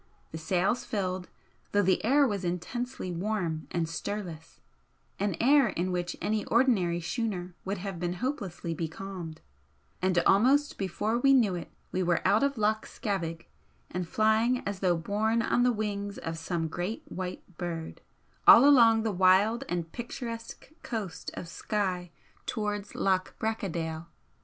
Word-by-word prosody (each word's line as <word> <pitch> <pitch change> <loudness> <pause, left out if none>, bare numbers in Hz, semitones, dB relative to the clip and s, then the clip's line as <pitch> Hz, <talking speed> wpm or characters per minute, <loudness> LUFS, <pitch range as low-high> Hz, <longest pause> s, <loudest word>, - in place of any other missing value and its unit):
The 160 - -6
sails 185 +8 +1
filled, 185 -3 -3 0.4
though 205 0 +4
the 185 0 +2
air 280 +6 +5
was 200 -4 -2
intensely 185 +5 -3
warm 175 -3 -2
and 170 -2 -1
stirless 165 -1 -5 0.6
an 200 -3 0
air 275 +1 +5
in 185 -2 -2
which 175 -1 -2
any 215 0 0
ordinary 210 -9 +3
schooner 180 -1 -3
would 195 +2 -2
have 190 -2 -5
been 175 0 -1
hopelessly 190 - -3
becalmed, 165 0 -6 0.6
and 185 -1 +1
almost 265 +9 +4
before 210 +4 -1
we 275 +2 +5
knew 230 -8 +4
it 170 -3 -6 0.2
we 185 - 0
were 175 -1 +1
out 205 +3 +4
of 280 -2 +1
Loch 215 0 +1
Scavaig 170 -5 -3 0.4
and 180 0 -3
flying 220 +5 +2
as 200 -2 -3
though 180 -3 +2
borne 215 +6 0
on 240 - +2
the 250 0 +4
wings 205 -2 -3
of 165 0 -4
some 165 0 -2
great 175 +7 -4
white 185 -1 -5 0.2
bird, 165 -2 -5 0.5
all 260 +5 +10
along 230 -5 +6
the 220 - 0
wild 190 +5 +4
and 170 -2 -2
picturesque 235 +1 -7
coast 195 -8 -4
of 170 - -6
Skye 185 -1 -2 0.4
towards 210 -2 -3
Loch 185 -1 0
Bracadale. 170 -7 -3
195 Hz, 145 wpm, -29 LUFS, 175-220 Hz, 0.6 s, all